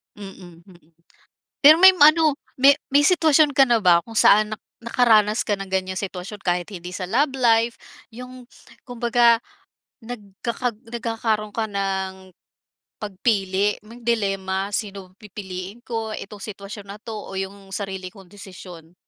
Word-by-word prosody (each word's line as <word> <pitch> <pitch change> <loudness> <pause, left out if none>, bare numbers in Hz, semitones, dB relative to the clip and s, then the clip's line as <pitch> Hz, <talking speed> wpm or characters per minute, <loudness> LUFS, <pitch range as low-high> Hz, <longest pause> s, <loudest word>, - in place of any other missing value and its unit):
Mm, 190 -4 -12
mm. 180 0 -19 0.9
Pero 310 +3 +8
may 380 0 +8
ano 310 -1 +5 0.2
may 275 +2 +7 0.2
may 285 +1 +4
sitwasyon 310 -5 +3
ka 275 - +7
na 240 -3 +2
ba 175 -3 +4
kung 225 -1 -12
saan 215 +1 +5
na 215 - -4 0.3
nakaranas 225 -3 +2
ka 205 - +1
ng 195 -1 -9
ganyan 185 0 -2
sitwasyon 195 +1 -6
kahit 175 -1 -1
hindi 180 -3 -9
sa 185 0 -5
love 270 +9 +1
life, 230 -1 +2 0.3
yung 250 +2 -11 0.4
kumbaga 235 -2 +2 0.6
nagkakag 230 +1 -5
nagkakaro'n 225 -2 -3
ka 225 -1 -1
ng, 190 -2 -4 0.7
pagpili 200 -1 0
may 230 +3 -13
dilema 195 -4 -1
sino 195 -3 -4
pipiliin 195 +1 -8
ko 225 -2 -4
itong 205 0 -10
sitwasyon 200 0 -9
na 200 +1 -9
'to 225 - -7
o 200 - -9
yung 195 0 -7
sarili 190 -2 -5
kong 190 -4 -16
desisyon? 180 -4 -12
210 Hz, 140 wpm, -22 LUFS, 190-235 Hz, 0.9 s, Pero